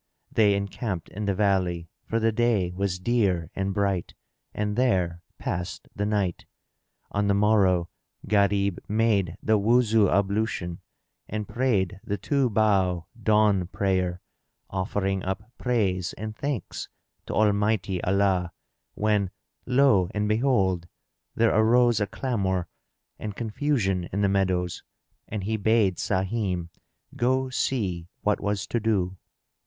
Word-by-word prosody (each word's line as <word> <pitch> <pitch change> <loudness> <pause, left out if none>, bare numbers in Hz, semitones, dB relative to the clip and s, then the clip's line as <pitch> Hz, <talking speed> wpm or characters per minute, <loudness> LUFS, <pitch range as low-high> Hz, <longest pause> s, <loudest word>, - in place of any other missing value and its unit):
They 105 -3 +4
encamped 100 -2 -3
in 105 +2 -5
the 100 -1 0
valley, 90 -4 +1 0.2
for 115 - 0
the 115 0 +2
day 110 -5 +1
was 95 0 -1
clear 95 -5 0
and 95 0 -1
bright, 100 -2 -1 0.4
and 105 0 -2
there 90 -9 +1 0.2
passed 90 +2 -4
the 105 0 -1
night. 100 -5 -1 0.6
On 100 0 0
the 100 - +3
morrow, 100 -4 +3 0.4
Gharib 100 -2 +2
made 105 -5 +1
the 110 -1 +3
Wuzu 110 -1 +4
ablution 100 -3 0 0.5
and 105 -1 -3
prayed 105 -7 0
the 100 - -2
two 135 +5 +1
bow 95 -5 +2 0.2
dawn 105 -4 +3
prayer, 95 -2 -1 0.5
offering 95 0 -1
up 95 +2 -3 0.2
praise 95 -8 0
and 110 +1 -6
thanks 140 -6 -4 0.4
to - - -3
Almighty 105 -3 +1
Allah; 95 -2 +1 0.4
when, 105 -3 +1 0.4
lo 125 -8 +4
and 105 0 0
behold! 105 -7 +1 0.5
there 115 0 +3
arose 115 +1 +4
a 100 - +1
clamour 95 -7 -1 0.5
and 105 -2 -5
confusion 110 -6 0
in 100 - -1
the 100 - +4
meadows, 95 -3 0 0.5
and 105 -2 -4
he 110 +3 -1
bade 105 -3 +2
Sahim 95 -3 -1 0.5
go 130 +2 +1
see 95 -11 -1 0.2
what 105 0 +2
was 100 0 -1
to 120 - -1
do. 95 -4 0
100 Hz, 125 wpm, -26 LUFS, 95-110 Hz, 0.6 s, They